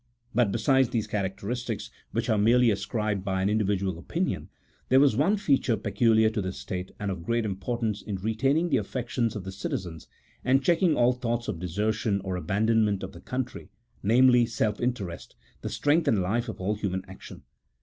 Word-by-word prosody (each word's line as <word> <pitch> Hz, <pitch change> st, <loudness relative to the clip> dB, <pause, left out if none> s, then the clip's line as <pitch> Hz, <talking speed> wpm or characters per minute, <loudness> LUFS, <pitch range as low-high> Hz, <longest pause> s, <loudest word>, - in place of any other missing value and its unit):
But 120 Hz, -5 st, +3 dB
besides 130 Hz, +4 st, +3 dB
these 110 Hz, -3 st, -1 dB
characteristics, 105 Hz, +3 st, -3 dB, 0.2 s
which -, -, -1 dB
are 110 Hz, -, +2 dB
merely 120 Hz, +2 st, +5 dB
ascribed 105 Hz, 0 st, -2 dB
by 95 Hz, -1 st, -1 dB
an 100 Hz, -, +2 dB
in 110 Hz, +1 st, +2 dB
dividual 95 Hz, -4 st, -1 dB
opinion, -, -, -2 dB, 0.4 s
there 130 Hz, -, +6 dB
was 140 Hz, -5 st, +4 dB
one 175 Hz, -, +3 dB
feature 135 Hz, -, +2 dB
peculiar 110 Hz, +1 st, +3 dB
to 110 Hz, -2 st, -2 dB
this 95 Hz, 0 st, -4 dB
state 90 Hz, 0 st, -5 dB
and 100 Hz, -1 st, -2 dB
of 95 Hz, -3 st, -5 dB
great 115 Hz, +4 st, 0 dB
importance 105 Hz, +2 st, -2 dB
in 105 Hz, -, -4 dB
retaining 135 Hz, -, +1 dB
the 135 Hz, -, +3 dB
affections 120 Hz, +1 st, -2 dB
of 105 Hz, -, -5 dB
the 95 Hz, -, -6 dB
citizens, 90 Hz, -3 st, -5 dB, 0.4 s
and 135 Hz, +2 st, +3 dB
checking 170 Hz, 0 st, +3 dB
ail 120 Hz, +1 st, +5 dB
thoughts 120 Hz, -1 st, -2 dB
of 85 Hz, -, -3 dB
desertion, 105 Hz, +3 st, -1 dB
or 95 Hz, -1 st, -3 dB
aban 100 Hz, +4 st, 0 dB
donment 110 Hz, -4 st, +2 dB
of 95 Hz, -, -5 dB
the 85 Hz, -, -12 dB
country: 125 Hz, -2 st, -5 dB, 0.3 s
namely, 120 Hz, +2 st, +5 dB
self 105 Hz, -2 st, -1 dB
interest, 115 Hz, -9 st, -3 dB, 0.3 s
the -, -, -4 dB
strength 150 Hz, +3 st, +1 dB
and 110 Hz, -, +3 dB
life 115 Hz, +6 st, -1 dB
of -, -, -7 dB
all 95 Hz, +3 st, 0 dB
human 95 Hz, -3 st, -3 dB
action. 95 Hz, 0 st, -11 dB
110 Hz, 185 wpm, -27 LUFS, 95-125 Hz, 0.4 s, there